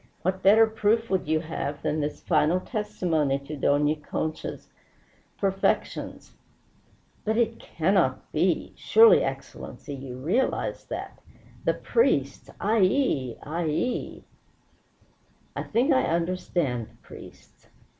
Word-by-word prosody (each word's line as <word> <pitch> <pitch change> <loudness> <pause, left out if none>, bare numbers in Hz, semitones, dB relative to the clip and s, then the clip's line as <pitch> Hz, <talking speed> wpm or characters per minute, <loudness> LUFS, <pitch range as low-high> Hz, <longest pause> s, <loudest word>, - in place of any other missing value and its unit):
"What 185 +1 -1
better 215 +4 +7
proof 220 +1 0
would 190 -5 0
you 155 0 +1
have 150 -3 -5
than 155 - 0
this 150 0 -3
final 165 +1 +2
testimony 180 - -1
to 140 +2 -8
Dona 145 +2 +2
Concha's 155 +1 -5 0.7
perfections?" 195 -1 -1 0.9
"But 220 +1 0
it 230 -1 +1
cannot 185 +4 0
be! - - 0
Surely, 455 +1 +6
Excellency, 145 - -6
you 130 -2 -7
realize 175 - -1
that? - - -6 0.5
The - - +2
priests! 470 - 0
Ay 220 +2 +1
yi! 185 - +1
Ay 165 +4 -3
yi!" 160 +11 -2 1.3
"I - - -2
think 250 +7 +2
I 260 - +4
understand 165 -8 -1
the - - -24
priests. - - -14
175 Hz, 115 wpm, -26 LUFS, 150-215 Hz, 1.3 s, better